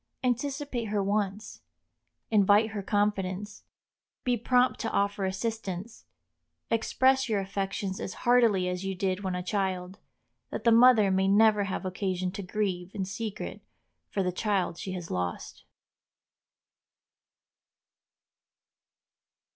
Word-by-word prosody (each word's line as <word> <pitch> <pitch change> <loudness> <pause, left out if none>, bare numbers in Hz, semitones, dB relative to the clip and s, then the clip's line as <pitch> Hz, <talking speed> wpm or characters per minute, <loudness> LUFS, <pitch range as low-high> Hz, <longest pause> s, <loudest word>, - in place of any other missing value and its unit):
Anticipate 260 0 -1
her 205 -1 -1
wants, 205 +1 -2 0.7
invite 210 +1 +4
her 210 -2 -4
confidence, 205 -1 -1 0.6
be 250 -1 +2
prompt 250 +2 +2
to 225 - -2
offer 200 -1 0
assistance, 200 0 -4 0.7
express 260 +3 +2
your 210 -2 +1
affections 195 0 -3
as 190 - -5
heartily 230 -7 +4
as 180 +1 -3
you 195 0 -3
did 185 0 -1
when 185 -1 -2
a 180 - -3
child, 190 -1 -2 0.5
that - - -5
the 235 - +5
mother 230 -4 +6
may 190 0 +2
never 210 0 +4
have 190 0 -4
occasion 185 -1 -2
to 195 - -6
grieve 185 -2 -2
in 195 -2 -2
secret 210 +2 -5 0.5
for 195 - -1
the 180 - 0
child 190 -3 -1
she 190 - -5
has 175 -3 -6
lost. 90 -1 -4
200 Hz, 120 wpm, -28 LUFS, 190-220 Hz, 0.7 s, mother